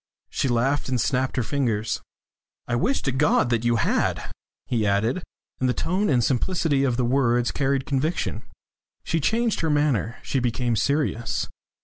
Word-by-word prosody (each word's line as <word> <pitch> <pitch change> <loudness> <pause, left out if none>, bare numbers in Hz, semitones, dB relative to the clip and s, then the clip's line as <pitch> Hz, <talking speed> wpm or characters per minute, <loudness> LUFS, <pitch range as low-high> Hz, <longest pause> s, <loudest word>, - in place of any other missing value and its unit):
She - - 0
laughed 130 +4 +1
and 125 -1 0
snapped 130 +2 0
her 125 - +1
fingers. 115 -4 -1 0.7
"I 120 - 0
wish 255 - 0
to 135 - 0
God 125 -4 +2
you 120 0 +2
had!" - - 0 0.3
he 115 -3 0
added, 105 - +1 0.4
and 130 - +1
the 125 - 0
tone 190 +5 0
and 125 -4 +3
simplicity 140 +2 +1
of 125 -3 +1
the 125 - +1
words 120 -1 +2
carried 135 -1 0
conviction. 150 +5 -1 0.6
She 165 - 0
changed 225 +8 +1
her 160 - 0
manner. 145 -6 +1
She 135 - -1
became 120 -1 0
serious. 140 -3 0
130 Hz, 155 wpm, -24 LUFS, 120-145 Hz, 0.7 s, and